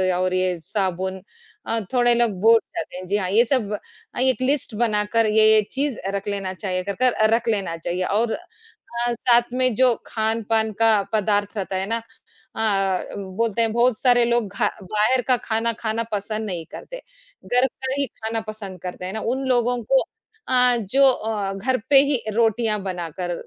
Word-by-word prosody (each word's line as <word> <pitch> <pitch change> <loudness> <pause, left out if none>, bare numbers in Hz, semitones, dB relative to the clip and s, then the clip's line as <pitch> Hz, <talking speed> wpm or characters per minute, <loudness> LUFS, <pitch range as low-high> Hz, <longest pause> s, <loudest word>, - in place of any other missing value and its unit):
और 185 0 0
ये 185 -1 0
साबुन 190 -1 -2 0.5
अ, 230 - 0
थोड़े 240 -1 +4
लोग 235 -2 +2
भूल 225 +2 +7 0.2
जाते - - -5
हैं। 185 - -7
जी, 200 +3 +1
हाँ, 185 -3 -2
ये 215 +5 +5
सब 230 -5 0 0.4
अ, - - -3
एक 260 0 +2
लिस्ट 265 -2 0
बनाकर 220 0 +1
ये-ये 215 0 +5
चीज़ 275 -2 -2
अ, 190 - -4
रख 200 +1 -4
लेना 195 -2 -3
चाहिए। 185 -1 -3
अगर 200 - -3
कर 255 -1 +5
अ, 215 - +2
रख 235 0 -3
लेना 195 -6 -1
चाहिए, 175 +2 -3
और 220 +4 +1
अ, 355 - -5 0.7
साथ 240 0 +2
में 255 -1 +1
जो 255 +1 +4
खान-पान 220 0 0
का 225 -2 +4
पदार्थ 205 0 0
रहता 195 -1 -3
है 190 0 -1
ना, 230 0 -1 0.6
हाँ, 195 -4 +1 0.3
बोलते 230 +2 0
हैं, 225 -1 +1
बहुत 240 0 +3
सारे 245 -2 +4
लोग 235 -2 +1
घा - - +1
बाहर 215 +7 +1
का 255 -1 +4
खाना 225 +1 +1
खाना 225 0 -1
पसंद 215 +1 -3
नहीं 175 -5 -4
करते। - - -9 0.4
घर 250 +2 +3
का 265 +1 -5
ही 280 - +1 0.2
खाना 225 0 -2
पसंद 200 -4 -7
करते 180 0 -6
हैं 185 - -5
ना। 220 - -3 0.2
उन 270 0 -4
लोगों 245 -1 +2
को 265 +4 +3 0.5
अ, 250 -1 +4
जो 275 - +3
अ, 215 -5 -3
घर 235 +7 0
पे 285 - +7
ही 280 -3 +1
रोटियाँ 225 -1 +1
बनाकर 175 -1 -4
220 Hz, 185 wpm, -22 LUFS, 195-240 Hz, 0.7 s, भूल